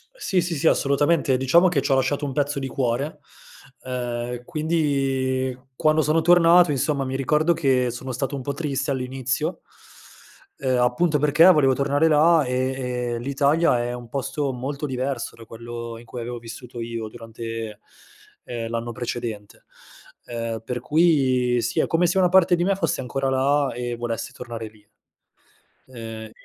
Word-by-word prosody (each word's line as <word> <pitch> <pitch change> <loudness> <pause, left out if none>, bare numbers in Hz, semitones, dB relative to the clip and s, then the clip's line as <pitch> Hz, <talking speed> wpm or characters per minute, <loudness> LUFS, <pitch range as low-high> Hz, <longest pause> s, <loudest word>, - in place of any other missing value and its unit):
Sì, 190 - 0
sì, 170 -1 -3
sì, 140 - +1
assolutamente. 140 -1 +2
Diciamo 170 +8 +4
che 145 -6 +1
ci 135 - -2
ho - - +5
lasciato 145 +2 0
un 135 -2 -2
pezzo 145 0 -1
di 135 - -3
cuore, 135 +4 -2 0.6
ehm, 120 -1 -4
quindi 135 -5 0 0.2
quando 155 +2 +2
sono 160 +2 +2
tornato 175 0 +6
insomma, 140 0 0
mi 130 0 -4
ricordo 150 +5 +2
che 130 -6 +1
sono 130 +2 -6
stato 135 +3 -3
un 130 - -5
po' 140 - -3
triste 140 -2 -2
all'inizio, 130 +5 -2 1.0
ehm, 130 -2 0
appunto 150 +6 +2
perché 150 +3 +4
volevo 140 -6 +4
tornare 140 +4 +2
là, 160 0 +4
ehm, 125 -1 -2
e - - -5
l'Italia 140 0 +2
è 120 0 -3
un 120 -1 -8
posto 140 +1 -2
molto 140 +4 -4
diverso 130 -2 -3
da 115 - -13
quello 115 +1 -7
in 120 - -13
cui 125 - -8
avevo 120 +1 -5
vissuto 120 +1 -9
io 115 -1 -4
durante, 115 -1 -7 0.6
ehm, 115 -2 -5
l'anno 115 0 -3
precedente, 115 -3 -6 0.6
ehm, 115 -1 -4
per 125 +2 -4
cui 130 -5 +2
sì, 120 - -1
è - - +2
come 170 +2 +2
se 185 +3 +2
una 180 -1 +4
parte 185 -1 +5
di 175 - 0
me 195 +2 +2
fosse 165 -8 -1
ancora 135 +1 -2
là 140 +1 +2
e 120 0 -4
volessi 115 -2 -4
tornare 115 -2 -7
lì. 105 -1 -20 1.1
Ehm 110 -2 -8
130 Hz, 165 wpm, -23 LUFS, 120-150 Hz, 1.1 s, tornato